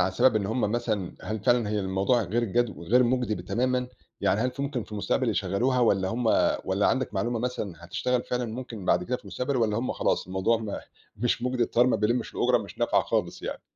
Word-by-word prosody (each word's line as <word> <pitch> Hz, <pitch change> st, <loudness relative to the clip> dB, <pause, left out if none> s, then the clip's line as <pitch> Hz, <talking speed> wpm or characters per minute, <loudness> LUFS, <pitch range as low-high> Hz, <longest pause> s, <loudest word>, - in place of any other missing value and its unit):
عن 95 Hz, -, +3 dB
السبب، 110 Hz, +5 st, +3 dB
إن 100 Hz, -2 st, 0 dB
هُم 115 Hz, +4 st, -1 dB
مثلًا 110 Hz, -4 st, -1 dB
هل 110 Hz, 0 st, -4 dB
فعلًا 120 Hz, -4 st, +3 dB
هي 105 Hz, -1 st, 0 dB
الموضوع 95 Hz, +6 st, +1 dB
غير 110 Hz, +5 st, 0 dB
جدّ 120 Hz, +2 st, +1 dB
غير 115 Hz, +9 st, +3 dB
مُجدي 120 Hz, -6 st, 0 dB
تمامًا؟ 125 Hz, +6 st, 0 dB, 0.3 s
يعني 105 Hz, -, +2 dB
هل 125 Hz, +2 st, +1 dB
في 130 Hz, +2 st, -5 dB
ممكن 140 Hz, -5 st, -2 dB
في -, -, -15 dB
المستقبل 105 Hz, -1 st, 0 dB
يشغِّلوها، 125 Hz, +6 st, +1 dB
والّا 95 Hz, -5 st, +3 dB
هُم 115 Hz, +3 st, -2 dB, 0.4 s
والّا -, -, +1 dB
عندك -, -, 0 dB
معلومة 120 Hz, 0 st, 0 dB
مثلًا 115 Hz, -6 st, -3 dB
هتشتغَل 125 Hz, +8 st, -1 dB
فعلًا 125 Hz, 0 st, -1 dB
ممكن 115 Hz, -3 st, -6 dB
بعد 90 Hz, -, +2 dB
كده 125 Hz, +6 st, -1 dB
في -, -, -19 dB
المستقبل؟ 130 Hz, +2 st, -2 dB
والّا 110 Hz, -3 st, +1 dB
هُم 125 Hz, -, -1 dB
خلاص -, -, 0 dB
الموضوع 95 Hz, +5 st, +1 dB
م 110 Hz, -2 st, -5 dB, 0.4 s
مش 120 Hz, +2 st, 0 dB
مُجدي، 125 Hz, 0 st, 0 dB
الطيار 120 Hz, +1 st, +3 dB
ما 125 Hz, -, +3 dB
بيلِّمِش 110 Hz, +4 st, 0 dB
الأجرة، -, -, +3 dB
مش -, -, -9 dB
نافعة -, -, +2 dB
خالص -, -, -2 dB
يعني؟ -, -, -5 dB
115 Hz, 215 wpm, -27 LUFS, 105-125 Hz, 0.4 s, عن